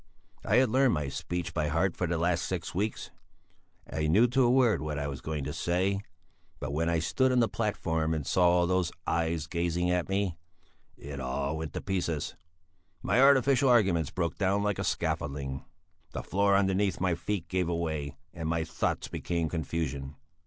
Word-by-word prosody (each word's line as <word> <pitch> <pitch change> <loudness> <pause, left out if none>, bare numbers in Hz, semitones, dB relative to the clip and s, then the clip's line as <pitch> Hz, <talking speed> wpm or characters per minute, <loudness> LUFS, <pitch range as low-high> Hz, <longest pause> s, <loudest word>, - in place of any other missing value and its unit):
I 105 - +2
had 130 0 +5
learnt 130 +2 +4
my 75 -4 -1
speech 85 +5 -4
by 75 -2 0
heart 80 +4 +1
for 90 - -1
the 85 0 0
last 85 +1 +1
six 90 -2 -4
weeks; 105 +4 -2 0.8
I 75 -1 -2
knew 100 +10 +5
to 135 +2 +2
a 120 - +4
word 125 -3 +4
what 75 -1 -3
I 70 - -2
was 70 -2 -6
going 75 -2 -3
to 75 +2 -4
say; 95 +3 0 0.6
but 65 - -4
when 85 +3 0
I 85 - +2
stood 130 +11 +1
on 125 - +3
the 115 - +4
platform 80 -8 -1
and 75 -3 -3
saw 90 +2 +4
all 90 0 +3
those 90 -1 +1
eyes 80 -2 0
gazing 85 +2 0
at 90 0 0
me, 95 -3 0 0.6
it 70 -1 -7
all 70 +3 -2
went 80 -2 -5
to - - -4
pieces; 85 -6 -2 0.7
my 125 - +3
artificial 135 -1 +5
arguments 95 - +3
broke 85 -3 -2
down 100 +1 +2
like 105 -2 0
a - - -1
scaffolding; 70 -2 -2 0.5
the - - -4
floor 100 +1 +2
underneath 95 0 +1
my 90 -1 +1
feet 85 +1 -3
gave 90 -1 0
way, 80 -5 -2 0.2
and 80 -2 -4
my 80 0 0
thoughts 80 +1 -2
became 85 -2 -2
confusion. 75 -3 -3
85 Hz, 185 wpm, -29 LUFS, 80-100 Hz, 0.8 s, had